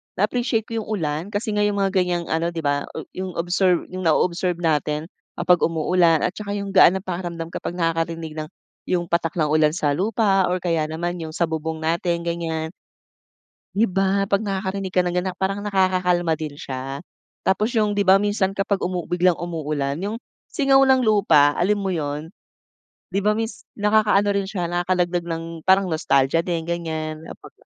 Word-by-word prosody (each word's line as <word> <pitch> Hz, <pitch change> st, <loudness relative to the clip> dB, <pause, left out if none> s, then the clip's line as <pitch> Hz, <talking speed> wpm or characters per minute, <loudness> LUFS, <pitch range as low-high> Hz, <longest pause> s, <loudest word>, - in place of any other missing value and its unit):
Na-appreciate 225 Hz, +2 st, 0 dB
ko 230 Hz, -1 st, -2 dB
yung 215 Hz, -, -7 dB
ulan 160 Hz, -5 st, -2 dB
kasi 215 Hz, +2 st, -1 dB
yung 205 Hz, -1 st, +1 dB
mga 195 Hz, -, +1 dB
ganyang 175 Hz, -1 st, 0 dB
ano, 165 Hz, +1 st, +1 dB
'di 165 Hz, -1 st, -4 dB
ba, 145 Hz, 0 st, 0 dB
o -, -, -4 dB
yung 185 Hz, -1 st, -5 dB
observe 175 Hz, +1 st, +1 dB
yung 185 Hz, 0 st, -5 dB
na-o-observe 175 Hz, +2 st, +1 dB
natin 150 Hz, 0 st, 0 dB, 0.3 s
kapag 180 Hz, -1 st, +3 dB
umuulan 165 Hz, 0 st, +2 dB
at 180 Hz, -, +1 dB
saka 200 Hz, +1 st, -5 dB
yung 200 Hz, -1 st, -4 dB
gaan 185 Hz, -1 st, +6 dB
ng 190 Hz, -, -4 dB
pakiramdam 170 Hz, -2 st, -5 dB
kapag 175 Hz, -, -5 dB
nakakarinig 165 Hz, -2 st, -2 dB
ng 155 Hz, -, -4 dB, 0.4 s
yung 175 Hz, -2 st, -1 dB
patak 170 Hz, -1 st, 0 dB
ng 155 Hz, -3 st, +1 dB
ulan 155 Hz, 0 st, +3 dB
sa 150 Hz, -4 st, +1 dB
lupa 195 Hz, +3 st, +2 dB
or 180 Hz, 0 st, -1 dB
kaya 165 Hz, -3 st, +1 dB
naman 175 Hz, +3 st, -3 dB
yung 160 Hz, -1 st, -6 dB
sa -, -, +1 dB
bubong 160 Hz, 0 st, -3 dB
natin 170 Hz, +1 st, 0 dB
ganyan. 165 Hz, -2 st, -3 dB, 1.0 s
'Di 215 Hz, +2 st, +2 dB
ba, 195 Hz, +1 st, +1 dB
'pag 200 Hz, +2 st, +1 dB
nakakarinig 190 Hz, -1 st, -3 dB
ka 180 Hz, -, +4 dB
ng 175 Hz, -1 st, -2 dB
ganyan 185 Hz, 0 st, -1 dB
parang 195 Hz, +2 st, -2 dB
nakakakalma 180 Hz, -4 st, +1 dB
din 155 Hz, -2 st, -5 dB
siya. 135 Hz, 0 st, -5 dB, 0.4 s
Tapos 210 Hz, +5 st, +1 dB
yung 210 Hz, -3 st, +1 dB
di 200 Hz, -, +2 dB
ba 190 Hz, +1 st, +6 dB
minsan 205 Hz, -1 st, +1 dB
kapag 195 Hz, 0 st, -1 dB
umu 180 Hz, -1 st, -2 dB
biglang 180 Hz, 0 st, +3 dB
umuulan, 150 Hz, -5 st, -2 dB
yung 215 Hz, +3 st, -3 dB, 0.3 s
singaw 275 Hz, -2 st, +4 dB
ng 265 Hz, -1 st, +4 dB
lupa, 195 Hz, -10 st, +4 dB
alam 205 Hz, +4 st, +2 dB
mo 195 Hz, -, -2 dB
yun, 150 Hz, -1 st, -3 dB, 0.8 s
'di 195 Hz, -, +1 dB
ba 210 Hz, -, +4 dB
miss 225 Hz, +1 st, -4 dB
nakakaano 210 Hz, -1 st, +3 dB
rin 200 Hz, -1 st, 0 dB
siya 180 Hz, -4 st, -3 dB
nakakadagdag 175 Hz, 0 st, 0 dB
ng 165 Hz, -1 st, -3 dB, 0.2 s
parang 190 Hz, 0 st, +4 dB
nostalgia 140 Hz, -1 st, +2 dB
din 170 Hz, -2 st, -1 dB
ganyan, 160 Hz, -2 st, -4 dB, 0.2 s
pagka -, -, -16 dB
180 Hz, 175 wpm, -22 LUFS, 165-195 Hz, 1.0 s, gaan